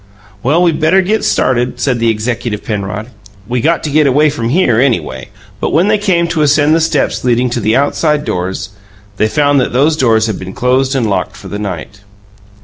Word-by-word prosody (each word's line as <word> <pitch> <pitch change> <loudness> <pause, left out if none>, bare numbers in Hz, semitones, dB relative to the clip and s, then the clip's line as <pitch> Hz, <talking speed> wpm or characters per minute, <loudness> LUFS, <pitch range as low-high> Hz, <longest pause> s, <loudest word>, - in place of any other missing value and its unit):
"Well, 155 +7 +2
we 175 - +4
better 160 +5 +2
get 215 +4 0
started," 125 0 0
said 125 -1 0
the 115 0 +2
executive 115 0 -3
Penrod. 105 +2 -4 0.4
"We 120 +1 -1
got 165 +6 +1
to 150 - -3
get 150 0 +3
away 145 +3 +3
from 115 -5 -3
here, 130 -7 +2
anyway." 110 - -1 0.3
But - - -2
when 175 +6 +3
they 215 -1 +2
came 180 -4 +1
to 165 -3 -1
ascend 150 +1 +3
the 165 - +2
steps 160 -3 0
leading 125 0 +1
to 120 - -1
the 110 0 +1
"outside 150 +1 +1
doors", 95 +1 -3 0.5
they 110 - +2
found 145 +5 +2
that 125 - -2
those 145 +5 +2
doors 115 -6 +2
had 110 -4 -3
been 95 0 -8
closed 130 +2 0
and 120 -4 0
locked 100 - -2
for - - -11
the 105 - -5
night. 100 +1 -6
125 Hz, 205 wpm, -13 LUFS, 110-150 Hz, 0.5 s, we